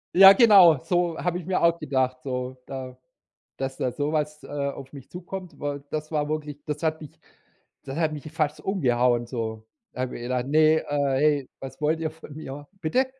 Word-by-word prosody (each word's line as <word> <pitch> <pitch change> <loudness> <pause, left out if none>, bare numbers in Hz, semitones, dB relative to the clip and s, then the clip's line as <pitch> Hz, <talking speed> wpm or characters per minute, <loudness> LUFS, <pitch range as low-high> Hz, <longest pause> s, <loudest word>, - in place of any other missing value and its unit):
Ja, 195 +1 +11
genau 195 - +7
so 175 -2 0
habe 175 0 -1
ich 175 - -8
mir 185 0 0
auch 170 0 +3
gedacht, 130 -3 -1
so 125 -1 -4
da 130 -2 -7 0.6
dass 135 0 -3
da 125 - 0
so 145 +2 -2
was, 150 -1 -2
äh, - - -11
auf 140 -1 -4
mich 135 -3 -11
zukommt, 180 0 -8
weil 145 -1 -4
das 155 +1 -4
war 150 -1 0
wirklich 150 -2 -4
das 150 0 -4
hat 160 -1 0
mich 150 -3 -12 0.7
das 135 0 -6
hat 160 -2 +1
mich 150 +1 -7
fast 155 -2 -1
umgehauen 125 - +1
so. 110 -3 -4 0.3
Habe 130 0 -3
ich - - -8
mir 120 - -5
gedacht: 125 0 -1
„Ne, 155 +2 +4
äh, 140 -1 +1
ey, 145 -3 +2
was 135 +2 -9
wollt 155 +2 +1
ihr 160 -1 -1
von 155 -2 -13
mir?” 145 -1 -8
Bitte? 255 +12 +2
150 Hz, 200 wpm, -25 LUFS, 130-160 Hz, 0.7 s, Ja